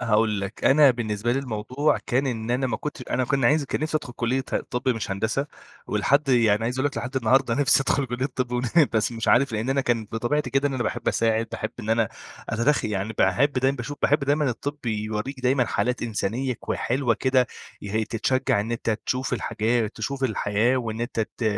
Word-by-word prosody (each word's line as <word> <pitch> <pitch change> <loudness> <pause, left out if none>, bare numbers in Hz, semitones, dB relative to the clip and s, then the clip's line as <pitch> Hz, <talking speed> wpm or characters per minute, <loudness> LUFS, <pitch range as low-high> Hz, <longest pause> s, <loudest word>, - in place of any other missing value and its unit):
هاقول 110 -3 +2
لك؛ 100 +3 -6
أنا 145 0 +7
بالنسبة 115 -1 -1
لي 135 - +1
الموضوع 130 +3 0
كان 135 +3 +1
إن 115 -2 -3
أنا 130 +2 +1
ما 120 - -1
كنتش 150 - -6
أنا 130 - +1
كن 135 +1 0
عايز 150 +4 +4
كان - - -3
نِفْسي 155 0 0
أدخل 125 - -6
كُلِّية 125 +3 -1
ه - - +3
طِب 125 +2 -2
مش 115 -5 -1
هندسة، 110 +8 -1 0.4
ولحد 140 +1 +1
يعني 115 -4 +3
عايز 125 +3 -2
أقول 130 - +2
لك 145 - -4
لحد 125 +4 -5
النهارده 130 0 +3
نِفْسي 135 -1 +4
أدخل 135 0 +1
كُلِّية 125 +3 -2
طِب، 130 -2 -3
ون 125 0 0 0.3
بس 110 +2 +1
مش 115 -1 -3
عارف 130 +1 +4
لأن 110 +4 -1
أنا 135 - +2
كان 120 -4 0
بطبيعتي 120 +7 -1
كده 135 +1 +2
إن 135 - -4
أنا 125 - -1
باحب 115 +2 -2
أساعد، 115 0 +1
باحب 110 - -3
إن 110 -1 -4
أنا 115 -2 +2 0.4
أتدخ 115 +6 +1
يعني 105 0 -2
باحب 140 +3 +3
دايمًا 135 +1 +1
باشوف 145 -1 -5
باحب 145 +2 +4
دايمًا 145 0 +2
الطِب 140 +3 -5
يوريك 110 +4 -3
دايمًا 125 0 +2
حالات 125 +2 -1
إنسانية 120 +3 -1
كو - - -4
حلوة 125 -1 0
كده 130 -1 +2 0.4
يه 110 +2 -1
تتشجع 115 -1 0
إن 110 +3 -3
أنت 115 -1 -2 0.2
تشوف 130 0 -1
الحاجات 115 -1 0
تشوف 135 +5 -3
الحياة 110 +1 +1
وإن 115 -2 -3
أنت 120 -1 -2
ت 110 +2 -4
125 Hz, 210 wpm, -24 LUFS, 110-135 Hz, 0.4 s, أنا